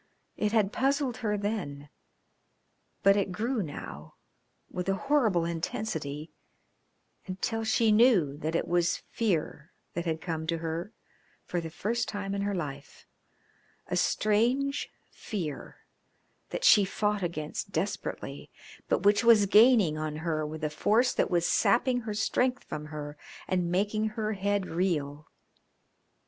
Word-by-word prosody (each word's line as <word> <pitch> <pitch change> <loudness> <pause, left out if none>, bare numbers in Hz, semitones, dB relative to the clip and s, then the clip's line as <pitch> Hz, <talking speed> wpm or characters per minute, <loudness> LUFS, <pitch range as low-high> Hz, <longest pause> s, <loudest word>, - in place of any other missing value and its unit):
It 210 -1 0
had 215 -3 +2
puzzled 270 -1 +1
her 210 -4 -1
then, 185 -9 -3 1.2
but 195 0 +6
it 200 -2 0
grew 230 +5 -1
now 80 - -8 0.5
with 180 +1 -4
a 195 - +2
horrible 225 - +2
intensity, 160 -3 -4 1.0
until 225 +5 -2
she 220 0 +3
knew 210 - +4
that 160 +2 -3
it - - 0
was 175 0 +1
fear 170 -6 -1 0.2
that 170 - -3
had 160 -1 -1
come 160 -2 -4
to 165 0 0
her 165 +4 -4 0.5
for 175 - -2
the 165 - -6
first 220 +8 -2
time 200 -1 -4
in 200 - -1
her 200 0 -1
life 145 -5 -6 0.8
a - - -1
strange 245 +7 +1 0.2
fear 170 - -5 0.7
that - - -4
she 210 - +7
fought 210 +1 -1
against 170 +2 -4
desperately, 185 +4 -4 0.4
but - - +1
which 205 +3 +4
was 230 -3 +6
gaining 210 -6 +5
on 155 -1 -3
her 155 -2 0
with 155 +1 -7
a 150 - 0
force 230 +10 +2
that - - +1
was 175 -1 +2
sapping 245 +1 +3
her 220 -3 -5
strength 250 +4 +1
from 150 0 -6
her 150 -1 -7 0.3
and 180 -2 0
making 205 +4 +1
her 215 -1 -2
head 200 0 0
reel. 155 -5 -2
195 Hz, 140 wpm, -29 LUFS, 160-220 Hz, 1.2 s, she